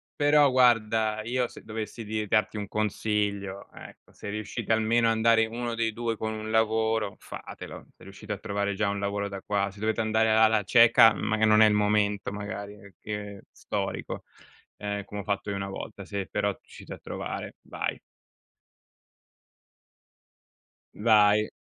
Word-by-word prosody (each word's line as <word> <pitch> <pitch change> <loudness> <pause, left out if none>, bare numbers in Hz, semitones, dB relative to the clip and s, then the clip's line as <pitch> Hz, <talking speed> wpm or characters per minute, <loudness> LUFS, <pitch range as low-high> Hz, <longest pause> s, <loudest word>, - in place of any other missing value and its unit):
Però 145 -1 +5
guarda 110 -3 +3
io 125 +1 0
se - - -13
dovessi 110 +1 -6
dir 110 0 -3
darti 110 +1 +1
un 105 - -4
consiglio, 105 -2 -2
ecco, - - -14
se - - -8
riuscite 110 +2 -4
almeno 115 +1 +2
a - - +4
andare 110 0 +4
1 120 +1 -4
dei 115 -1 0
2 115 -1 -2
con 110 +1 -3
un 110 0 -6
lavoro, 110 -1 +1
fatelo. - - -9
Se - - -18
riuscite 100 +2 -10
a - - -5
trovare 100 0 -2
già 100 +1 0
un 100 0 -2
lavoro 100 0 -2
da 100 -1 -7
qua. 100 -1 0
Se 100 - -15
dovete 110 +1 0
andare 110 0 +2
alla 110 -1 +4
cieca, 115 +1 +6
mag 110 -1 -2
e 110 - +6
non 110 0 +5
è 110 - +8
il 105 - +3
momento 105 -1 +1
magari 100 0 -6
e 100 -1 -15
che 105 -1 -6
storico, - - -4 0.5
ehm, 100 0 -4
come 100 +1 -6
ho - - -10
fatto 100 0 -2
io 100 - -3
una 100 0 -4
volta. 100 +1 -7
Se 100 -1 -4
però 100 0 0
riuscite - - -11
a - - -8
trovare, - - -6
vai. - - -4 2.9
Vai. 105 -1 +4
105 Hz, 165 wpm, -27 LUFS, 100-110 Hz, 2.9 s, è